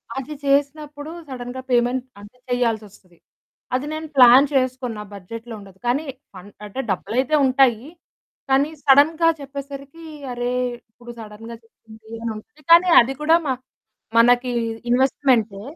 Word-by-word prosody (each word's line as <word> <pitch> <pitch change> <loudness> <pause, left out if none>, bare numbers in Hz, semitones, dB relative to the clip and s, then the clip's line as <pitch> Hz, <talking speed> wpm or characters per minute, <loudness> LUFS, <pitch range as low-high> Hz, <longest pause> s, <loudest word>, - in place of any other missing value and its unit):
అది 270 +3 -5
చేసినప్పుడు 290 +2 -1 0.2
సడెన్‌గా 250 0 -7
పేమెంట్ 245 +1 +1 0.2
అంటే 205 +4 -15
చేయాల్సొస్తది. 215 -7 -3 0.6
అది 260 - -2
నేను 315 0 -5
ప్లాన్ 255 +2 +8
చేసుకున్నా 255 -4 -1
బడ్జెట్‌లో 225 +5 -9
ఉండదు. 195 -2 -15
కానీ, 275 +6 0 0.3
అన్ 200 +3 -14
అంటే 210 +6 -5
డబ్బులైతే 240 +10 -1
ఉంటాయి. 260 -2 +2 0.6
కానీ, 275 +3 +3
సడెన్‌గా 310 +4 +5
చెప్పేసరికి 280 +3 -9 0.3
అరే, 245 0 -2 0.4
ఇప్పుడు 240 +1 -12
సడెన్‌గా 225 +2 -10
చెప్పింది 220 -1 -19 0.2
అని 230 - -2
అను 295 +8 -14
కానీ, 350 +2 +6
అది 265 +3 -3
కూడా 320 +2 +4
మాక్ 260 -1 -3 0.5
మనకి 245 +1 +4 0.4
ఇన్వెస్ట్‌మెంటే, 245 -5 +1
255 Hz, 120 wpm, -21 LUFS, 225-280 Hz, 0.6 s, ప్లాన్